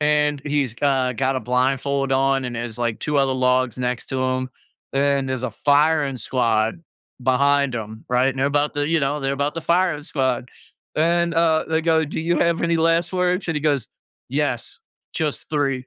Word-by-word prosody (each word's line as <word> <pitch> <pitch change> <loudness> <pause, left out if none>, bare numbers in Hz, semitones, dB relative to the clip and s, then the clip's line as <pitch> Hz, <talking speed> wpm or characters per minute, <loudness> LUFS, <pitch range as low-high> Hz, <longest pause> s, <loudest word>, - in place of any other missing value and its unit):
and 150 -1 +2
he's, 145 -5 -1
got 130 -1 0
got 135 +1 0
a - - -1
blindfold 135 +2 0
on, 135 0 +2
and 125 -1 -4
there's, 120 0 -5
like, 120 -2 -1
2 150 - -1
other 135 -1 +2
logs 130 -1 +1
next 125 -1 -2
to 130 - -3
him, 130 0 -1 0.4
and 140 -1 +1
there's 130 -1 -3
a 130 - -2
firing 145 0 +2
squad 115 +1 0 0.4
behind 140 +1 +2
him, 110 0 -7
right, 125 +2 +3
and 135 - -8
they're 135 - +2
about 145 +1 0
to, 145 0 0
you 165 0 +2
know, 145 +1 -1
they're 135 0 -1
about 140 +2 -1
to 165 - -3
fire 170 -2 +1
squad, 130 -4 -1 0.5
and, 170 +2 +2
uh, 165 -1 +3
they 160 0 +1
go, 160 -1 +3
"Do 150 - -5
you 170 +2 0
have 170 -1 +2
any 170 0 +2
last 165 +1 +2
words?" 180 0 0
and 165 - 0
he - - -1
goes, 145 -5 0 0.4
"Yes. - - -2 0.3
Just 155 -3 -3
3." 135 -4 -1
140 Hz, 195 wpm, -22 LUFS, 130-155 Hz, 0.5 s, right